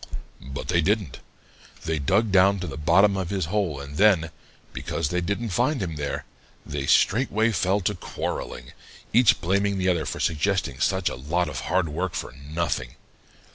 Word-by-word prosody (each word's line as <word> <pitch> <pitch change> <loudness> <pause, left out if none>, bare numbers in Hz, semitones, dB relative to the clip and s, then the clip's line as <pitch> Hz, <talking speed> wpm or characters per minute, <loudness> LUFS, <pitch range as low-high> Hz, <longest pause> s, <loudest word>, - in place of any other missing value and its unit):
"But 65 +1 -7
they 85 -1 +3
didn't. 100 - 0 0.7
They 80 -1 -1
dug 100 +10 +2
down 95 +1 +5
to - - -3
the 75 -6 -6
bottom 90 +6 +4
of 95 -3 -2
his 95 -4 -1
hole 90 -4 -1
and 70 +1 -8
then, 95 -6 +4 0.4
because 80 -3 -2
they 90 0 0
didn't 100 +6 -2
find 125 +9 +1
him 85 -5 -3
there, 75 -1 -4 0.4
they 70 -1 -4
straightway 110 0 +3
fell 95 +1 +1
to 100 +3 0
quarreling, 60 -8 -5 0.4
each 120 -3 +5
blaming 100 +3 +1
the 95 0 +1
other 85 -5 0
for - - -4
suggesting 80 -3 0
such 95 +1 +1
a - - 0
lot 80 +7 -1
of 70 -4 -4
hard 90 -1 +2
work 85 +4 -3
for - - -4
nothing. 70 -2 -3
90 Hz, 175 wpm, -25 LUFS, 75-100 Hz, 0.7 s, down